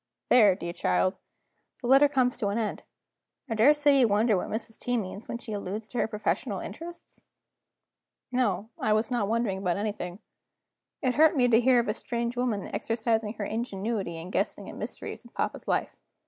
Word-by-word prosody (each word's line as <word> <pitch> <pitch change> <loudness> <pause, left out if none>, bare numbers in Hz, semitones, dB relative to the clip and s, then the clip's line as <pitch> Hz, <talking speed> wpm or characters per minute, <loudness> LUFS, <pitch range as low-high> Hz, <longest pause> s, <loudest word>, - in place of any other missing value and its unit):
There, 210 -6 +6
dear 170 -2 -5
child, 185 +1 +1 0.7
the - - -8
letter 270 +3 +7
comes 260 -3 +1
to 205 - -1
an 200 +2 -1
end. 220 -2 -2 0.7
I 230 - -2
daresay 285 +5 +5
you 245 - +5
wonder 215 +1 +3
what 180 - -2
Mrs. 220 0 -5
T. 245 0 -1
means, 205 0 -5
when - - -3
she 225 -2 -7
alludes 205 +2 -4
to 245 - -3
her - - +2
professional 210 -1 -2
interests?" 335 +11 -9 1.1
No: 220 -4 0
I 215 - +2
was 215 +3 0
not 235 -5 +1
wondering 220 -3 0
about 180 -2 0
anything. 205 -4 -3 0.9
It 255 -1 +2
hurt 310 +3 +5
me 250 -1 +4
to 230 0 +5
hear 250 0 +5
of 235 - 0
a 210 - +1
strange 235 +1 -3
woman 240 -5 -1
exercising 225 -2 0
her 215 -3 -4
ingenuity 210 -5 -3
in 170 +3 -8
guessing - - -1
at - - -11
mysteries - - -6
in - - -15
papa's - - -3
life. - - 0
225 Hz, 185 wpm, -28 LUFS, 205-245 Hz, 1.1 s, letter